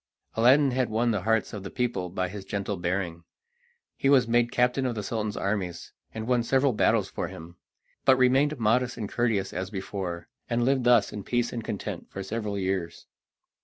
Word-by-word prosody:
Aladdin 130 +5 +5
had 125 0 0
won 115 +2 +1
the 105 -4 -1
hearts 115 +2 +1
of 105 - -5
the 95 - -7
people 120 -7 -2
by 95 +1 -2
his 100 +2 -7
gentle 100 +1 -3
bearing. 85 -1 -2 0.7
He 135 - +1
was 130 -4 +5
made 120 0 +2
captain 125 +2 +2
of 120 - -2
the 105 - -3
Sultan's 105 0 -3
armies, 95 -3 -3 0.2
and 110 0 -5
won 125 0 +2
several 130 +2 +2
battles - - +2
for - - -4
him, 85 +2 -11 0.5
but 130 - +5
remained 135 +4 +3
modest 125 +3 +1
and 105 - -3
courteous 110 -4 0
as 95 +1 -3
before, 95 -3 -5 0.2
and 120 0 +1
lived 130 -1 +2
thus 120 -4 +4
in 105 - -5
peace 120 +2 -1
and 115 -2 -4
content - - -5
for 95 - -6
several 105 0 -3
years. 95 -3 -2
110 Hz, 190 wpm, -27 LUFS, 95-125 Hz, 0.7 s, Aladdin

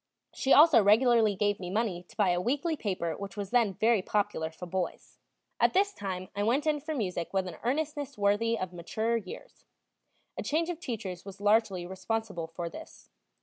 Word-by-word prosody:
She 270 - -1
also 300 -6 +8
regularly 220 0 +4
gave 205 +1 0
me 180 -1 -5
money 200 -3 -1
to - - -20
buy 205 -4 +3
a 175 0 0
weekly 290 - 0
paper 185 - -2
which 200 0 -8
was 200 -2 -4
then 230 -6 +3
very 225 0 +3
popular 200 -5 -1
for 160 +3 -9
boys. 180 0 -4 0.4
At - - +4
this 405 +2 +2
time 185 - -5
I 205 - -1
went 245 +8 +1
in 305 -1 +1
for 305 +2 -4
music 180 - -3
with 190 -1 0
an 170 -3 -7
earnestness 285 +1 -2
worthy 210 +3 +2
of 185 -1 -4
maturer 220 +7 -1
years; 230 - -10 0.7
a - - -4
change 330 +3 0
of 335 - -7
teachers 205 - -5
was 195 0 -10
largely 205 -3 +2
responsible 190 -1 -3
for 170 +1 -5
this. 165 - -11
205 Hz, 190 wpm, -29 LUFS, 185-245 Hz, 0.7 s, also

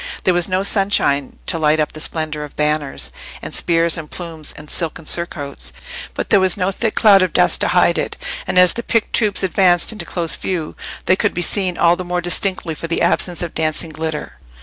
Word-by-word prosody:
There 185 - +2
was 175 -1 +1
no 185 0 -1
sunshine 195 -9 +1
to 165 - -1
light 155 0 +2
up 155 - 0
the 155 - -9
splendour 155 -1 -3
of 150 - -11
banners, 150 - -1 0.3
and - - -8
spears, 165 0 +2
and 155 -2 -9
plumes, 165 -4 -5
and 150 - -11
silken 160 0 -3
surcoats, 145 - -1 0.4
but - - -5
there 200 - +6
was 190 0 +3
no 190 0 0
thick 220 +3 -3
cloud 205 -4 +6
of 185 - 0
dust - - +3
to - - +3
hide - - +2
it, - - -4 0.3
and - - -2
as 180 -1 +7
the 235 - -4
picked 230 -1 -1
troops 210 -3 +3
advanced 180 0 +3
into 210 -5 -6
close 170 -1 -2
view, 170 -5 -4 0.3
they 185 - +4
could 205 +1 -1
be 175 - +1
seen 185 -1 +1
all 170 +1 +4
the 185 - -6
more 180 0 -2
distinctly 175 -1 -1
for 165 - -7
the 165 - -1
absence 175 -1 +2
of 170 - -6
dancing 160 +1 -1
glitter. 155 0 -6
170 Hz, 215 wpm, -18 LUFS, 155-185 Hz, 0.4 s, as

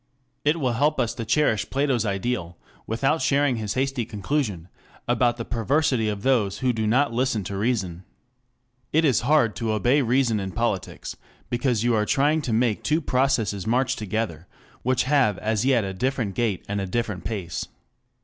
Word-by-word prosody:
It 150 +3 +2
will 130 -5 0
help 150 +6 +1
us 115 - +1
to 115 - -5
cherish 110 -3 +1
Plato's 135 -5 +1
ideal, 95 -4 -2 0.3
without 135 +8 +1
sharing 140 -3 +2
his 105 -2 -3
hasty 135 -1 0
conclusion 105 - -2 0.4
about 120 0 +2
the 115 - -5
perversity 125 -1 +1
of 105 -1 -4
those 115 -7 +2
who 130 -1 +1
do 110 -1 -1
not 130 +4 +2
listen 120 -3 0
to 100 +2 -5
reason. 95 -5 -1 0.9
It 160 +2 +3
is 130 -7 +3
hard 125 -4 +3
to 115 -2 -1
obey 120 +7 +3
reason 120 -3 +2
in 95 -2 -5
politics, 115 -5 -2 0.4
because 120 -2 +1
you 120 0 +2
are 105 -1 +1
trying 150 +3 +2
to 125 - -3
make 115 -1 +1
two 155 +2 +1
processes 125 - 0
march 130 +2 +1
together, 105 -4 -3 0.3
which 130 0 +1
have 130 -7 +2
as 110 +1 -1
yet 130 -5 +3
a 95 -1 -4
different 120 -1 -1
gait 110 -3 -1
and 100 0 -2
a 95 - -3
different 105 -2 -2
pace. 95 -6 -4
120 Hz, 175 wpm, -24 LUFS, 105-135 Hz, 0.9 s, It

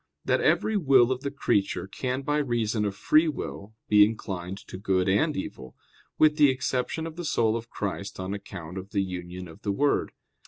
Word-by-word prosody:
6] - - -10
that - - +3
every 220 - +2
will 135 - +5
of 130 0 -1
the 140 - -2
creature 105 -10 0
can 125 +7 -3
by 145 +1 0
reason 115 -5 0
of 100 -1 -2
free 155 +10 +4
will 110 -8 -5
be 105 -1 +7
inclined 95 -4 -2
to 100 - -11
good 95 -1 +1
and 125 +11 +2
evil; 65 -8 -6 0.4
with 155 -1 +4
the 145 -2 +6
exception 130 +4 -1
of 165 0 -7
the 175 - -4
soul 115 -8 +1
of 115 0 -5
Christ 100 -1 -4
on 95 +1 -3
account 95 -3 -7
of 95 +3 -11
the 100 -2 +2
union 90 -1 -6
of 80 - -14
the 100 - -1
Word. 140 +8 +1
110 Hz, 200 wpm, -27 LUFS, 95-140 Hz, 0.4 s, be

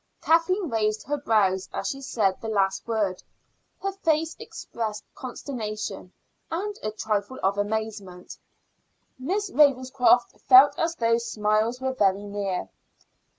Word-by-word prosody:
Kathleen 340 +4 +2
raised 215 -4 0
her 290 +2 -2
brows 200 -8 +1
as - - -3
she 275 - -5
said 210 -8 0
the 225 - -5
last 195 -2 0
word; 205 -5 -1 0.6
her 390 - 0
face 325 -4 0
expressed 220 -3 -5
consternation 215 -7 -6 0.4
and 400 +5 -3
a 215 - -2
trifle 215 +2 -2
of 195 +2 +1
amazement. 205 -3 -4 0.8
Miss 380 +9 -2
Ravenscroft 255 -4 +3
felt 275 +3 +8
as 330 +1 0
though 230 -2 +2
smiles 215 +1 0
were 260 0 -2
very 200 -4 +2
near. 200 -2 -3
225 Hz, 125 wpm, -25 LUFS, 205-275 Hz, 0.8 s, felt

